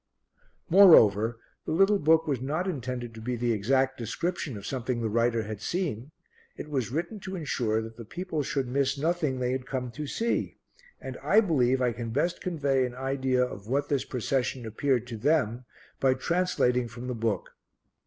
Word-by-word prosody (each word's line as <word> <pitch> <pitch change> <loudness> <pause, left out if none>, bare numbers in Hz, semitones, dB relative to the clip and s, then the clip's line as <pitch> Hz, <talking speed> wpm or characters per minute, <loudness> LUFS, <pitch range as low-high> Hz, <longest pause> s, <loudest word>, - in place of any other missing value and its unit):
Moreover, 115 - +6 0.3
the - - -1
little 195 +4 +4
book 160 +1 +4
was 140 -5 -1
not 155 +8 -2
intended 125 -7 -4
to 110 - -10
be 125 +2 -2
the 120 0 0
exact 130 +5 +1
description 155 - -3
of 100 - -9
something 125 -1 -2
the 115 -1 -1
writer 115 0 +1
had 105 -1 -6
seen; 145 - -2 0.5
it 150 - -8
was 130 -5 -1
written 170 - -3
to 190 -1 -6
ensure 120 -9 -1
that 115 0 -10
the 115 - -7
people 165 - -4
should 135 -1 -2
miss 135 +2 0
nothing 155 -3 0
they 125 0 -1
had 130 0 -3
come 125 -2 -3
to 145 +6 -6
see, 230 +10 -1 0.4
and - - -7
I - - +5
believe 130 - +2
I 125 - +2
can 115 0 -5
best 150 +9 -1
convey 140 -7 +1
an 120 - -9
idea 130 -1 0
of 100 -4 -9
what 140 +4 0
this 140 -2 +1
procession 130 -1 -2
appeared 120 +2 0
to 120 -2 -6
them 125 -2 +1 0.3
by 130 -1 +3
translating 130 -6 +1
from 120 +2 -9
the 125 - -3
book. 115 -5 -2
130 Hz, 185 wpm, -28 LUFS, 120-150 Hz, 0.5 s, Moreover